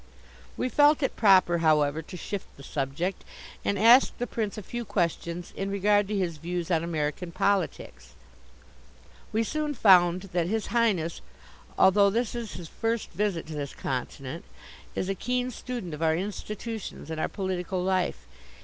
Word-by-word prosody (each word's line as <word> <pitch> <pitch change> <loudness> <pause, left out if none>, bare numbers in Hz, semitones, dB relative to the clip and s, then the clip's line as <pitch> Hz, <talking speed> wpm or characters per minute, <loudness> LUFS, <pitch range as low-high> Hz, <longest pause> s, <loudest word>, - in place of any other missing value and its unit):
We - - 0
felt 290 +4 +4
it - - 0
proper, 185 -5 +5
however, 155 -1 +3
to 170 +3 -9
shift 200 +3 -5
the 140 - -12
subject, 145 +7 -3 0.4
and 200 - 0
asked 235 +6 +6
the 245 - -1
Prince 220 -4 -3
a 210 - -6
few 240 +5 -5
questions 170 -3 -2
in 195 0 -3
regard 205 +1 +2
to 210 0 -2
his 175 -4 -1
views 175 +2 -4
on 165 -1 +2
American 165 +1 -2
politics. 200 +3 -1 1.2
We 220 0 +1
soon 300 +4 -2
found 180 -4 +5
that 175 -1 +1
His 220 +2 -2
Highness, 205 -9 +1 0.6
although 200 +1 +6
this 230 +3 -1
is 235 -3 -5
his 170 +1 -7
first 225 +5 -2
visit 190 -2 -1
to 160 - -8
this 145 -2 -5
continent, 135 +4 -4 0.5
is 185 - -1
a 195 - 0
keen 250 +5 -1
student 240 -9 -6
of 150 - -6
our 160 -1 +3
institutions 210 -1 -5
and 160 - -3
our - - 0
political 185 -2 -2
life. 180 - 0
185 Hz, 160 wpm, -27 LUFS, 165-215 Hz, 1.2 s, asked